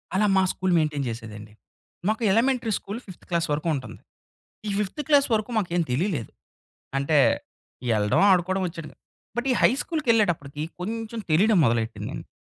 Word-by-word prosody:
అలా 210 +2 +3
మా 190 - +4
school 185 -1 -1
maintain 150 -3 0
చేసేదండి. 110 -2 -8 0.5
మాకు 220 +2 0
ఎలమెంటరీ 240 +1 +2
స్కూల్ 205 +4 -6
ఫిఫ్త్ 185 -3 -13
క్లాస్ 170 -1 0
వరకు 150 +3 -1
ఉంటంది. 130 - -7 0.7
ఈ - - -1
ఫిఫ్త్ 210 +9 -2
క్లాస్ 285 -2 +5
వరకు 215 +1 0
మాకేం 175 -4 0
తెలియలేదు. 145 - -1 0.7
అంటే 140 +2 +2 0.8
ఎళ్ళడం, 105 -1 +2
ఆడుకోవడం 185 +1 +2
వచ్చేడం. 165 -2 -7 0.4
బట్ 240 +2 -1
ఈ 250 - +3
హైస్కూల్‌కెళ్ళేటప్పటికి 220 - +1 0.2
కొంచెం 225 +4 -4
తెలియడం 200 +6 +4
మొదలెట్టిందండి. 115 -1 -2
185 Hz, 135 wpm, -25 LUFS, 145-220 Hz, 0.8 s, క్లాస్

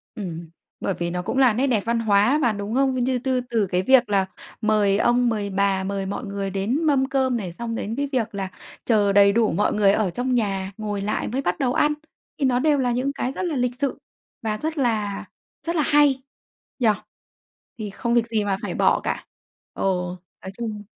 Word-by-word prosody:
Ừm, 170 -5 -6 0.3
bởi 195 - -1
vì 170 -1 -3
nó 180 +1 -2
cũng 265 - -3
là 255 -5 +5
nét 265 +5 +1
đẹp 230 -5 +2
văn 230 0 +1
hóa 215 +5 +3
mà, 240 - +3
đúng 205 +2 -4
không? 270 -1 +3
Như 255 0 0
tư 255 0 0
từ 220 -5 +1
cái 180 0 0
việc 245 +1 +4
là 195 -2 +2 0.4
mời 210 -2 +3
ông, 240 +1 +3
mời 205 -3 -2
bà, 195 0 +1
mời 195 0 -2
mọi 200 +5 -4
người 200 -1 -3
đến 210 - -1
mâm 275 -3 +3
cơm 260 -3 +1
này, 180 -6 -5
xong 230 +2 -4
đến 225 +1 -3
cái 285 +1 -1
việc 230 -5 -1
là 190 -1 -3 0.4
chờ 205 -4 +3
đầy 200 0 +6
đủ 225 0 +2
mọi 205 - +1
người 200 -2 +4
ở 205 -2 +1
trong 245 +7 -1
nhà, 195 -4 -1
ngồi 205 -2 -3
lại 210 +1 -1
mới 260 +4 -2
bắt 180 -7 -1
đầu 250 -2 +1
ăn. 300 0 +3 0.4
Thì 275 - 0
nó 250 -1 +2
đều 295 0 +3
là 250 -2 +1
những 255 +3 0
cái 255 - -2
rất 370 - -4
là 320 -4 -1
lịch 250 -1 0
sự 280 -2 -1 0.4
và 215 -2 -2
rất 315 +3 -3
là 215 -6 0 0.4
rất 340 - 0
là 310 - +3
hay, 285 -3 +3 0.6
nhỉ? 230 -3 +4 0.9
Thì 210 -2 -4
không 235 +4 -2
việc 235 -1 +3
gì 220 -3 0
mà 195 -1 0
phải - - -3
bỏ - - +3
cả. - - -3 0.5
Ờ, - - -6 0.6
nói 190 - -6
chung 215 -3 -4
225 Hz, 220 wpm, -23 LUFS, 200-255 Hz, 0.9 s, đầy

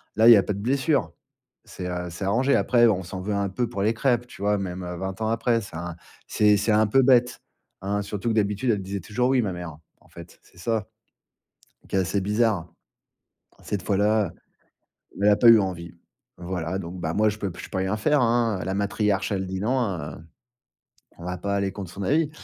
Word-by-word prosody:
Là, 110 +1 +5
il - - +11
y - - +8
a 100 - +3
pas - - -2
de 100 - -6
blessures, 135 +6 0 0.5
c'est, 90 - -7
heu, 90 0 -4
c'est 85 +4 -5
arrangé. 125 +8 +2
Après, 120 -1 +4
on 100 -4 +1
s'en 90 +2 -7
veut 105 +3 -3
un 100 0 0
peu 120 +6 -2
pour 110 -4 -5
les 110 +3 +2
crêpes, 120 0 +1
tu 125 - -13
vois? 105 0 +2
Même 95 -1 -5 0.2
20 95 +1 -5
ans 110 - 0
après, 115 +1 +1
c'est 100 -6 -10
un 85 +1 -5 0.3
c'est 105 0 +3
un 110 +1 +4
peu 135 +6 +4
bête, 125 -2 +3 0.4
hein. 100 +2 -1
Surtout 105 +3 -3
que, 110 - 0
d'habitude, 105 +3 0
elle 105 -3 -1
disait 100 +1 -4
toujours 115 +7 -1
oui 130 -1 +3
ma 100 -5 -2
mère, 90 -3 -7 0.3
en - - -24
fait, 85 0 -13
c'est - - -21
ça, 110 +1 -1 1.0
qui - - -4
est - - +4
assez 95 +2 0
bizarre. 105 -3 +1 1.0
Cette 100 -3 -3
fois-là, 105 0 +1 0.9
elle 105 - +5
a 105 - +4
pas 120 - +4
eu 115 -1 +9
envie. 90 -4 -4 0.4
Voilà, 90 0 -4
donc, 90 0 -7
bah, 80 -1 -2
moi 110 +3 +3
je 105 - -5
peux 100 -2 -3
p 85 - -10
je - - -9
peux - - -4
rien 95 +2 0
faire, 150 +7 +2
hein, 115 -3 +2
la 95 - -2
matriarche 100 0 0
elle 95 -1 -2
dit 95 0 -4
non, 125 +5 +1 0.2
heu, 75 0 -7 1.0
on - - -11
va 90 0 -3
pas 100 +3 -2
aller 100 -1 0
contre 95 -3 -7
son 100 - -6
avis. 150 - +2
100 Hz, 220 wpm, -25 LUFS, 95-115 Hz, 1.0 s, il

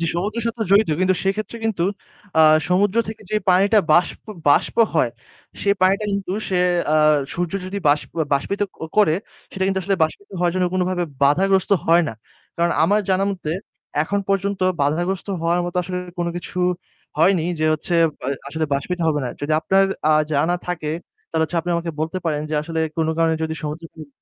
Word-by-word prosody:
যে 165 - 0
সমুদ্রের 210 +6 -2
সাথে 230 0 -3
জড়িত 200 -1 +5
কিন্তু 185 0 +3
সেক্ষেত্রে 210 +4 -2
কিন্তু 200 -6 0 0.6
আ - - +8 0.3
সমুদ্র 195 +4 +2
থেকে 220 - -7
যে 215 - +1
পানিটা 200 +4 +4
বাষ্প 175 - +2 0.3
বাষ্প 145 - +3 0.2
হয়, 125 -7 +2 0.5
সে 200 - +1
পানিটা 195 +3 +3
কিন্তু 195 -2 -2 0.2
সে 185 -2 +1 0.4
আ - - +5 0.4
সূর্য 175 +1 -2
যদি 200 +2 -4
বাস 145 +1 +4 0.3
বাষ্পিত 140 +9 0 0.2
ক - - -28 0.2
করে 205 -7 +5 0.4
সেটা 190 - -1
কিন্তু 190 0 0
আসলে 195 +1 0
বাষ্পিত 180 +6 -1
হওয়ার 175 -1 +1
জন্য 185 - +1
কোনভাবে 180 -1 0 0.2
বাধাগ্রস্ত 190 +7 +3 0.2
হয় 170 +1 +5
না। - - -6 0.4
কারণ 170 0 +2
আমার 205 +5 +3
জানামতে 190 -4 0 0.5
এখন 200 +6 -1
পর্যন্ত 195 0 0 0.2
বাধাগ্রস্ত 175 +7 -1
হওয়ার 170 +1 +1
মতো 175 +1 -5
আসলে 180 +1 -4 0.2
কোন 175 - 0
কিছু 175 - -6 0.6
হয়নি 175 0 +4 0.2
যে, - - +2
হচ্ছে 155 +3 -3 0.3
আ - - 0 0.2
আসলে 160 +2 -2
বাষ্পিত 180 +6 -2
হবে 150 -2 +1
না। 125 - -2
যদি 145 +2 -2
আপনার 195 +3 +3 0.3
আ - - +6 0.2
জানা 160 +5 +2
থাকে 170 -4 -3 0.4
তাহলে 160 -1 0
হচ্ছে 170 +2 -2
আপনি 175 - -4
আমাকে 170 0 -3
বলতে 160 +4 -2
পারেন 155 -3 0
যা 155 - 0
আসলে 160 +1 -3 0.2
কোন 160 - +1
কারণে 165 -1 +3
যদি 160 0 -2
সমুদ্রের 155 +2 -6
তীর 155 -3 -10
180 Hz, 180 wpm, -21 LUFS, 160-195 Hz, 0.6 s, আ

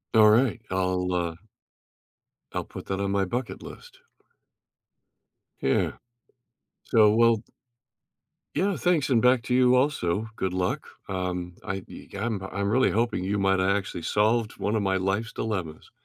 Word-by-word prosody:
Alright, 110 0 +5
I'll, 90 -1 0
uh 85 -2 -1 1.2
I'll - - -2
put - - -10
that 95 0 -3
on 100 0 -1
my 100 -1 +1
bucket 120 +6 -4
list. - - -12 1.6
Yeah, 65 - +1 0.9
so 110 -3 +5
well 115 -1 +4 1.1
Yeah, 195 0 +1
thanks, 170 -6 +1
and 120 -3 +4
back 125 0 +4
to 125 - -2
you 125 0 +5
also, 110 - +1
good 95 -1 -1
luck, 90 0 -1 0.2
um, 90 -2 -3
I 95 -2 -3
ye - - -11
I'm 105 -1 -2
I'm 100 +1 -3
really 130 +4 +3
hoping 115 -4 0
you 100 +2 0
might 95 -1 +2
o' 95 +1 +2
actually 100 -4 -1
solved 110 +3 +1
one 105 +2 0
of 105 - 0
my 95 -1 +1
life's 95 +4 -1
dilemmas. 95 -8 -4
100 Hz, 145 wpm, -26 LUFS, 95-115 Hz, 1.6 s, Alright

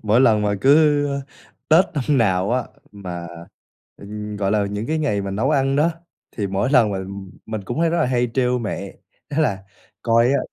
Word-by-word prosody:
Mỗi 110 +3 +3
lần 110 -5 +4
mà 105 0 +1
cứ, 145 +2 +4
ơ, 140 0 -2 0.5
Tết 165 +4 +6
năm 145 0 +1
nào 95 -3 +1
á 125 -1 0 0.3
mà, 90 -4 -7 0.7
ừm, 105 +1 -7
gọi 100 -1 -1
là, 105 -1 +1
những 105 +2 -4
cái 160 +3 -1
ngày 140 -10 0
mà 100 - -4
nấu 110 +8 0
ăn 135 -2 +1
đó, 155 +4 +3 0.4
thì 105 - -3
mỗi 100 +6 -1
lần 120 -7 +4
mà, 95 - -2
ừm, 95 0 -7 0.2
mình 110 -3 -5
cũng 120 +10 -3
hay 165 -1 +2
rất 170 - 0
là - - +2
hay 125 -1 0
trêu 125 -1 +1
mẹ, 100 -4 -5 0.4
đó 145 - -2
là 100 -10 0 0.4
"Coi 115 0 +3
á 140 - +2
115 Hz, 210 wpm, -21 LUFS, 100-140 Hz, 0.7 s, Tết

